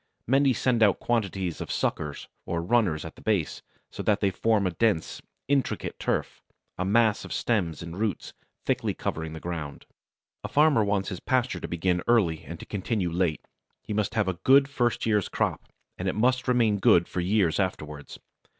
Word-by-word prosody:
Many 135 +2 +4
send 125 -1 +1
out 100 -4 +4
quantities 95 -7 -1
of - - -5
suckers 75 -2 -2 0.2
or 85 0 -2
runners 90 -7 +1
at 80 - -7
the - - -16
base, 100 -8 -1 0.3
so - - -6
that 105 -1 +2
they 100 -2 +1
form 110 +1 +1
a 90 - +1
dense, 100 -2 0 0.3
intricate 140 -1 -1
turf - - -2 0.3
a 95 - -2
mass 110 +2 +3
of - - -9
stems 85 -10 -1
and 85 0 -7
roots 110 -4 -2 0.3
thickly - - 0
covering 80 0 -4
the 80 - -7
ground. 80 -5 -6 0.6
A - - -3
farmer 145 -6 +4
wants 100 -1 0
his 95 -3 -5
pasture 130 -1 0
to - - -5
begin 90 +1 0
early 100 -10 +3
and 80 +4 -8
to - - -9
continue 95 -2 -2
late; 85 -2 -1 0.4
he - - -5
must 105 +1 -1
have 105 -3 +1
a 90 -2 -2
good 135 +1 +6
first 120 -4 0
year's 105 -4 +1
crop, - - -2 0.3
and - - -2
it - - 0
must 125 +3 +1
remain 115 -5 +3
good 85 -2 +5
for - - -4
years 95 -2 +2
afterwards. 75 -6 -4
100 Hz, 185 wpm, -27 LUFS, 85-115 Hz, 0.6 s, good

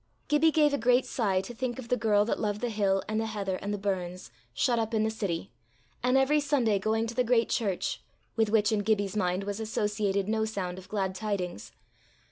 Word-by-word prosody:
Gibbie 295 +2 +5
gave 300 -2 +3
a 285 - +1
great 245 +2 +3
sigh 195 -6 0
to 240 - -8
think 245 +1 -3
of 245 -3 -8
the 250 - +3
girl 210 -3 +3
that 230 - -1
loved 210 -1 -1
the 245 -1 -1
hill 195 -2 +1
and 215 +1 0
the 225 - -2
heather 200 -3 -2
and 205 - -4
the 205 - -1
burns, 185 - -3 0.2
shut 235 - +1
up 225 0 -1
in 215 - +2
the 220 - +1
city, 195 -5 -3 0.5
and 250 +2 +3
every 275 +3 +4
Sunday 255 -8 +2
going 220 +3 0
to 230 - -5
the 250 - +2
great 235 -1 +2
church 200 -7 -1 0.3
with 225 -2 +2
which 210 -1 +3
in 215 - +2
Gibbie's 205 -1 0
mind 185 -1 0
was 205 +1 -4
associated 210 -2 -1
no 220 0 +1
sound 190 -4 -3
of 185 - -14
glad 195 -3 -1
tidings. 185 - -4
215 Hz, 220 wpm, -29 LUFS, 195-235 Hz, 0.5 s, Gibbie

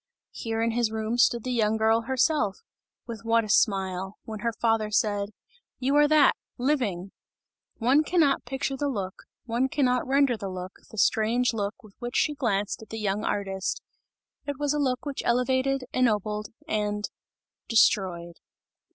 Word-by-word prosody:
Here 225 0 -3
in 230 - +1
his 235 -1 +1
room 220 +2 -2
stood 235 -1 +3
the 255 - -3
young 220 -2 +2
girl 220 +1 +3
herself 260 -5 +1 0.5
with 230 -3 -7
what 230 0 +3
a 215 - -7
smile 190 -2 +1
when 220 -1 -7
her 235 +2 0
father 225 -2 +1
said: 205 -1 +1 0.5
"You 270 +2 0
are 295 0 +6
that, 300 -2 +5 0.2
living!" 240 -9 -1 0.7
One 260 +6 +3
cannot 310 -4 +2
picture 270 +2 -3
the 285 +2 -1
look, 195 -7 -3 0.3
one 245 +3 0
cannot 250 -3 +1
render 275 -2 +3
the 200 -3 -5
look, 185 0 -6 0.2
the 220 - -12
strange 225 +4 +2
look 205 0 -3
with 210 -2 -16
which 240 0 -5
she 300 - +2
glanced 210 -9 -1
at 220 - -13
the 225 - -6
young 210 -1 -1
artist; 195 -2 -2 0.6
it 285 -2 -3
was 290 0 0
a 295 - 0
look 260 -2 0
which 285 -2 -3
elevated, 260 +2 +1
ennobled 210 -4 +1 0.2
and 210 -2 -1 0.6
destroyed. 180 -7 +2
230 Hz, 160 wpm, -27 LUFS, 210-260 Hz, 0.7 s, are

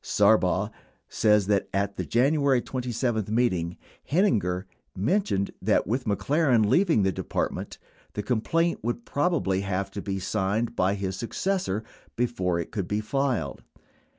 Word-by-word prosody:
Sarbaugh - - +3 0.4
says 105 -2 +3
that, 100 -1 +1
at 100 +1 -1
the - - -3
January 140 +1 +3
27 120 -3 -2
meet 120 0 +2
ing, 85 0 -3 0.3
Heininger 105 - +2 0.3
mentioned 105 - 0
that - - +2
with 125 +6 -1
McLaren 125 - +2
leaving 135 - +3
the 95 - +2
Depart - - -2
ment, - - -7 0.4
the 105 - -3
complaint 160 +10 +1
would 120 +1 -3
probably 145 - 0
have 100 0 -2
to 100 - -5
be 95 -1 -3
signed 105 +4 -1
by 95 +2 +2
his 95 -1 -3
successor 150 - -1 0.3
before 95 -8 0
it 85 - -4
could 100 -5 -3
be 105 - 0
filed. 110 - -1
110 Hz, 145 wpm, -26 LUFS, 95-130 Hz, 0.4 s, Sarbaugh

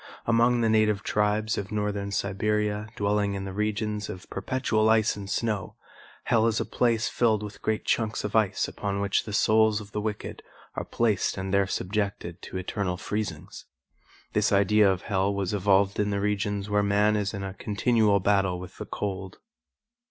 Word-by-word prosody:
Among 120 +1 +3
the 115 - +2
native 110 -2 +2
tribes 105 +2 0
of 100 0 -6
Northern 105 -1 -2
Siberia 105 +2 -1
dwelling 100 0 0
in 95 0 -4
the 95 - -6
regions 105 0 -2
of 90 0 -8
perpetual 110 -4 0
ice 110 -1 +3
and 100 -1 -8
snow, 105 -2 -2 0.5
hell 115 -1 +3
is 110 -1 +1
a - - -1
place 115 -2 +1
filled 110 -3 +1
with 105 0 -8
great 110 0 -1
chunks 110 -2 0
of 105 +1 -4
ice 105 -3 +2
upon 100 -1 -3
which 100 -1 0
the 105 - -6
souls 110 0 +3
of 105 -1 -11
the 105 - -2
wicked 105 -1 -4 0.3
are - - -4
placed 110 -5 0
and 95 0 -3
there 100 -1 +3
subjected 100 -3 -3
to - - -6
eternal 95 0 -2
freezings. 105 -7 -5 0.7
This - - +2
idea 100 0 +4
of 90 -2 -3
hell 95 0 0
was 100 -1 -2
evolved 100 0 +2
in 105 0 +1
the 100 -1 -1
regions 100 0 -1
where 105 0 +2
man 105 +1 +3
is 105 -2 -1
in 100 -2 -5
a 95 -1 -5
continual 105 0 +2
battle 95 -2 +1
with 90 0 -10
the - - -6
cold. 95 -2 -4
105 Hz, 180 wpm, -27 LUFS, 100-110 Hz, 0.7 s, idea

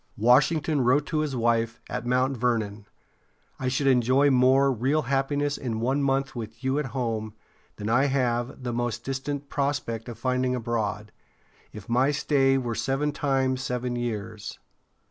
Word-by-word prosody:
Washington 145 +6 +3
wrote 130 +4 +3
to 155 0 -1
his 150 -3 -1
wife, 115 -1 +1
at 125 -1 -4
Mount 130 +2 +1
Vernon: 110 -4 -1 0.7
"I 130 - -2
should 130 +2 0
enjoy 130 +2 +4
more 130 +2 +4
real 135 +6 +1
happiness 140 +2 0
in 115 -4 -3
one 130 +5 0
month 135 0 0
with 115 +1 -7
you 130 +2 +1
at 150 - -2
home 115 -5 -3 0.4
than 105 - -6
I 120 +5 +3
have 125 -2 -1
the 120 -1 -2
most 120 -1 -2
distant 135 +1 -4
prospect 140 -5 -2
of 115 - -7
finding 125 +1 0
abroad, 110 -3 -2 0.6
if 105 -3 -10
my 125 +4 +3
stay 140 -2 +2
were 120 -3 -2
seven 135 +5 -1
times 135 -3 0
seven 125 -1 -2
years." 110 -3 -4
130 Hz, 155 wpm, -26 LUFS, 120-135 Hz, 0.7 s, enjoy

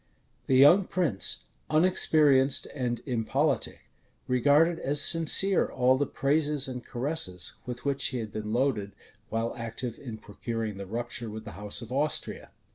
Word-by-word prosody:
The 130 - +2
young 170 +9 +6
prince, 115 - +1 0.2
unexperienced 155 -5 +3
and 125 -4 -3
impolitic, 135 +3 -1 0.5
regarded 145 +7 +3
as 145 +2 -1
sincere 165 +5 +5
all 130 0 +2
the 140 +1 -1
praises 145 0 0
and 125 -2 -6
caresses 120 - -2
with 125 +1 -7
which 140 -1 0
he 130 - -1
had 110 -3 -6
been 105 0 -5
loaded 115 -5 -1 0.4
while 115 +1 -2
active 115 0 -6
in 120 -6 -8
procuring 110 0 -6
the 100 -1 -8
rupture 120 +2 -4
with 110 +1 -8
the - - -8
house 105 +4 -6
of 115 - -12
Austria. 145 +4 -2
130 Hz, 145 wpm, -27 LUFS, 115-145 Hz, 0.5 s, young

